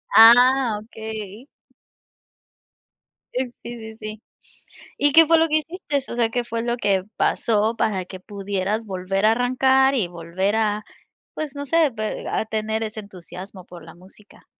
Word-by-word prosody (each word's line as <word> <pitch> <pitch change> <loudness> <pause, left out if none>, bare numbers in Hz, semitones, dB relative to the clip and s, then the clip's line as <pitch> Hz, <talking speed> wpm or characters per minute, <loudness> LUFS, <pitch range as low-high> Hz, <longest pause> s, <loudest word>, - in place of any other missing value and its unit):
Ah, 245 +1 +7
okey. 220 +1 -8 1.9
Sí, 250 -1 -2
sí, 225 -2 -8
sí. 215 0 -7 0.8
¿Y 290 0 +3
qué 325 +3 +8
fue 330 +1 +5
lo 325 - +3
que 310 - 0
hiciste? 320 -1 -3
O - - -4
sea, 235 -2 +2
¿qué 245 +1 -1
fue 230 -1 -3
lo 240 0 -1
que 195 -5 +1
pasó 220 0 +1
para 190 -5 -1
que 185 +1 -10
pudieras 200 +2 -3
volver 195 0 -2
a 220 - +6
arrancar 260 +3 +3
y 220 -9 +1
volver 175 +4 -2
a 215 -1 0 0.5
pues 305 -3 -5
no 285 0 -5
sé, 330 +1 +3
ve 215 -1 -4
a - - -1
tener 220 0 -2
ese 215 0 -5
entusiasmo 185 -1 -11
por 175 -2 -12
la 165 0 -12
música. 190 +4 -17
220 Hz, 155 wpm, -22 LUFS, 200-245 Hz, 1.9 s, qué